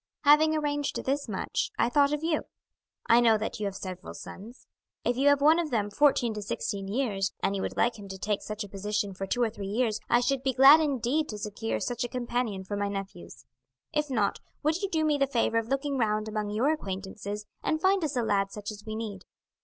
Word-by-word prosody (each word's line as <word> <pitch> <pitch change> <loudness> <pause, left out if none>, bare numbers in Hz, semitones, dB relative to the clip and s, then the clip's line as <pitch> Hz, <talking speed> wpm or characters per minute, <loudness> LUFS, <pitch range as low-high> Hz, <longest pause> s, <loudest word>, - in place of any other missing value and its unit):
"Having 310 +2 +6
arranged 290 -2 -1
this 275 -1 -1
much, 195 - -2
I - - +3
thought 280 +3 +3
of 300 +1 -2
you. 325 -1 0 0.6
I 230 - +6
know 225 -2 +5
that 215 +1 -4
you 210 - -1
have 195 - -5
several 185 -1 -7
sons. 230 +6 -10 0.4
If 240 - +2
you 270 +3 +2
have 285 -1 +5
one 310 +3 +6
of 335 -3 -1
from 210 -5 -1
fourteen 260 -2 +3
to 210 - -5
sixteen 200 0 -3
years, 200 -4 -1
and 195 - +1
you 195 - -2
would - - -4
like 235 -2 +1
him 200 - -9
to 190 0 -7
take 210 +1 -1
such 215 0 -5
a - - -8
position 200 0 -2
for 195 +1 -5
two 245 +4 +1
or 225 - +1
three 200 -3 -6
years, 220 +1 0
I 240 - +5
should 270 +1 0
be 265 0 0
glad 275 +4 +9
indeed 290 0 0
to 210 - -5
secure 210 +2 -3
such 245 0 -2
a - - -1
companion 240 -5 -2
for 205 +2 -4
my 205 0 -1
nephews. 195 -3 -7 0.5
If 300 -1 0
not, 220 -6 0 0.2
would 310 +4 +1
you 395 - -1
do 320 -4 +1
me 300 -2 +2
the 275 - +3
favour 230 -3 +1
of 225 - -5
looking 275 +1 -1
round 215 -1 +1
among 215 -1 -2
your 230 +8 +2
acquaintances 200 -4 -5 0.2
and 315 - 0
find 380 +1 +3
us 295 -4 -1
a 240 - +1
lad 195 -2 +1
such 210 +1 -6
as 210 -1 -10
we 215 0 -5
need. 210 -4 -6
230 Hz, 230 wpm, -28 LUFS, 205-280 Hz, 0.6 s, glad